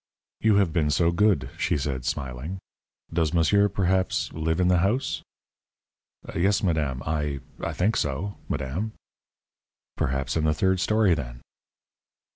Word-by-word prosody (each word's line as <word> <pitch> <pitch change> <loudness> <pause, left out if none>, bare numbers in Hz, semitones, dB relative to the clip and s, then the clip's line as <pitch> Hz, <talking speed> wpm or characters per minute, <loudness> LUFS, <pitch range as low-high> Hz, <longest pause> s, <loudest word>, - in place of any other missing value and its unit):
"You 110 -2 +4
have 100 -5 +3
been 75 -3 +2
so 85 +4 +3
good," 85 - +2
she - - +1
said, 65 -3 -3
smiling. 65 +7 -3 0.6
"Does 80 0 +1
monsieur, 100 +5 +4
perhaps, 95 -1 0
live 80 +1 -1
in 90 - +3
the 90 -1 +4
house?" 105 +9 0 1.1
"Yes, 95 +5 +2
madame. 75 -7 0
I 75 -2 -1 0.2
I - - -3
think 105 +6 +1
so, 75 +9 -1 0.2
madame." 90 +12 -2 1.0
"Perhaps 65 +1 -1
in 80 -1 +1
the 75 0 +2
third 95 +2 +2
story, 105 +1 +3
then?" 60 -5 -5
85 Hz, 135 wpm, -26 LUFS, 70-95 Hz, 1.1 s, You